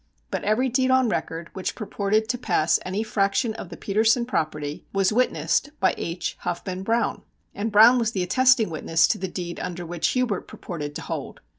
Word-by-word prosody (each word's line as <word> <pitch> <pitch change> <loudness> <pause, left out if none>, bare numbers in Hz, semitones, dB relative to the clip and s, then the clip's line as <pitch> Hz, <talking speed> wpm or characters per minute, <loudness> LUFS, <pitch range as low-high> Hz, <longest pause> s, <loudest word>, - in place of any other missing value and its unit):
But - - -2
every 215 +6 +2
deed 260 +1 +1
on 260 -2 +4
record 165 -4 -3
which 190 - -3
purported 215 0 0
to 245 - 0
pass 175 -9 +2
any 190 +4 -2
fraction 215 +2 0
of 195 - -8
the 170 - -9
Petersen 220 +4 +2
property 155 -7 -3
was 195 +1 +2
witnessed 210 - +1
by 190 - +3
H. 170 +1 -4
Huffman 185 +1 -4
Browne! 230 +4 0 0.3
And 215 +2 -3
Browne 225 +4 +7
was 225 -2 0
the 190 -5 -1
attesting 255 +1 +3
witness 165 +1 +2
to - - 0
the 190 - -2
deed 175 -1 -5
under 175 -1 -5
which 170 0 -1
Hubert 250 -6 -1
purported 150 -4 -6
to - - -5
hold. - - -6
200 Hz, 185 wpm, -24 LUFS, 175-230 Hz, 0.3 s, Browne